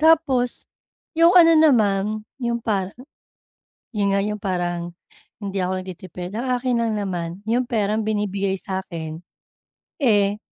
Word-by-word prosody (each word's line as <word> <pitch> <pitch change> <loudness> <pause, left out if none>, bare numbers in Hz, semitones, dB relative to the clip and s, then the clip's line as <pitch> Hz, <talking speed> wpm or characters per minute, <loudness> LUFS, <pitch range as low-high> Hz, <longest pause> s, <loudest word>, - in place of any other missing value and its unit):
tapos, 295 -6 +3 0.5
yung 335 +3 +5
ano 330 -2 +8
naman, 225 -11 +4 0.4
yung 235 -1 0
para 200 -5 -1 1.0
yun 205 -2 +1
nga 200 - +1
yung 210 0 -3
parang, 175 -2 -2 0.4
hindi 200 -2 -4
ako 185 0 -1
nagtitipid. 180 0 -8
Ang 240 +4 -3
akin 245 -1 0
lang 230 -1 0
naman, 180 -5 -2 0.2
yung 240 +3 0
perang 215 -2 +1
binibigay 200 -2 -1
sakin, 170 -4 -5 0.8
eh, 205 -6 +3
205 Hz, 125 wpm, -22 LUFS, 185-240 Hz, 1.0 s, ano